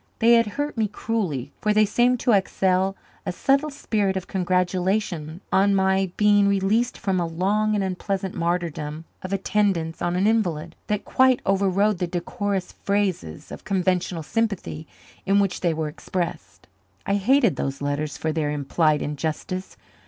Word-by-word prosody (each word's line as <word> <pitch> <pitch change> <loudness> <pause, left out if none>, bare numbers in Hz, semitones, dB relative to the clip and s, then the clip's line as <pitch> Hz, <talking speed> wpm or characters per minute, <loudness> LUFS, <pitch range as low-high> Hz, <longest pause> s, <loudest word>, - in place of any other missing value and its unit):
They 230 +1 +5
had 230 -1 +5
hurt 290 -4 -2
me 215 - +2
cruelly, 190 - -3
for 210 0 +1
they 215 0 +5
seemed 245 +4 +2
to 245 - +2
exhale 190 -1 +2 0.3
a - - -2
subtle 275 +10 +1
spirit 210 -9 -1
of 190 - -4
congratulation 180 -2 -1
on 195 +1 +4
my 190 -1 +2
being 205 -1 +4
released 200 +5 +1
from 190 -2 0
a 170 - 0
long 205 +6 +1
and 200 - 0
unpleasant 190 0 -3
martyrdom 165 -3 -2 0.2
of 185 - -6
attendance 195 -4 0
on 175 0 0
an 185 +2 +2
invalid, 175 -7 0
that 210 -1 -1
quite 260 -1 +4
overrode 195 0 +2
the 180 - 0
decorous 185 +2 -3
phrases 190 - -2
of - - -8
conventional 180 -3 0
sympathy 200 -6 -2 0.4
in 200 +1 +4
which 195 -3 0
they 175 - +2
were 160 -1 -2
expressed. 150 - -5 0.4
I 200 - 0
hated 235 - +3
those 135 +1 -3
letters 145 +1 -2
for 160 - -1
their 155 -2 -1
implied 150 +1 +1
injustice. 160 +5 -4
190 Hz, 155 wpm, -24 LUFS, 170-210 Hz, 0.4 s, They